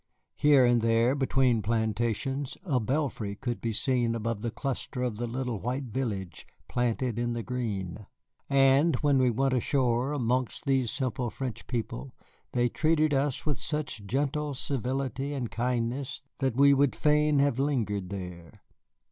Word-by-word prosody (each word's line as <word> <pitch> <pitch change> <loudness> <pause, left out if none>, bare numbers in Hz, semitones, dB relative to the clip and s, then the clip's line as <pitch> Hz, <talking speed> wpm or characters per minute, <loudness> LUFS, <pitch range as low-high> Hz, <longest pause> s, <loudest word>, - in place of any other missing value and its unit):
Here 145 -3 +5
and 120 -1 +4
there, 115 +2 +3
between 130 -4 +2
plantations, 115 +5 -1
a 140 -8 +1
belfry 120 -5 -1
could 120 +2 -4
be 115 - -1
seen 120 0 +1
above 115 -1 -2
the 120 - -1
cluster 125 +1 -3
of 120 -4 -2
the 120 +1 -2
little 125 -2 -3
white 125 +6 -2
village 105 -9 -4 0.2
planted 120 -1 -1
in 120 0 0
the 120 -1 -3
green; 105 -6 -4 0.4
and 140 +3 +5
when 145 -2 +3
we 130 -1 +4
went 135 +3 +1
ashore 125 0 +1
amongst 130 -1 -1
these 135 -4 +2
simple 130 -2 -2
French 130 0 -6
people 120 +2 -4 0.4
they 120 -1 +3
treated 155 +3 +2
us 140 -1 0
with 150 -5 -1
such 150 -8 -3
gentle 145 +4 -1
civility 135 +2 -2
and 125 -4 -3
kindness 125 +4 -2 0.2
that 130 -4 0
we 140 +1 +6
would 140 -1 +3
fain 150 0 +3
have 140 -2 +2
lingered 105 -10 0
there. 90 -4 -8
125 Hz, 150 wpm, -28 LUFS, 115-140 Hz, 0.4 s, we